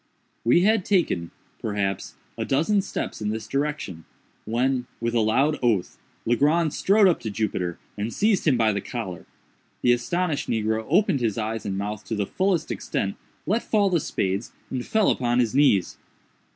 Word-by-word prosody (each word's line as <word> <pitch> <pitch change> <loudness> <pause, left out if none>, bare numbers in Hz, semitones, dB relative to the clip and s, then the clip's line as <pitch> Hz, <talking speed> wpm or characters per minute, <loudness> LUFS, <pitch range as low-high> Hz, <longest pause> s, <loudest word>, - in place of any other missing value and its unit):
We 120 +9 +4
had 215 +1 +3
taken, 165 - +1 0.3
perhaps, 100 -3 -2 0.2
a - - -3
dozen 165 +9 +2
steps 190 - -5
in 105 - -1
this 110 +1 -4
direction, 140 - -3 0.4
when, 125 +2 0
with 115 0 -1
a 120 - +3
loud 135 +7 +2
oath, 115 -7 0 0.3
Legrand 150 +6 +2
strode 200 +1 +4
up 175 - +2
to 110 - -4
Jupiter, 95 -5 -2 0.2
and 105 +3 -3
seized 205 - +1
him 135 -5 +4
by 110 -2 +3
the 100 - -2
collar. 100 -8 -6 0.6
The 120 - +6
astonished 160 +6 -1
negro 110 0 0
opened 175 -3 +3
his 110 -4 0
eyes 110 0 -3
and 95 -1 -2
mouth 105 +1 -4
to 110 - -3
the 105 -1 0
fullest 185 - 0
extent, 100 0 -2 0.3
let 220 +5 +1
fall 205 -3 +2
the 170 - +3
spades, 95 -5 -2 0.2
and 130 -2 -2
fell 220 - +2
upon 120 -1 0
his 120 -2 +2
knees. 130 -10 +3
120 Hz, 170 wpm, -25 LUFS, 105-160 Hz, 0.6 s, The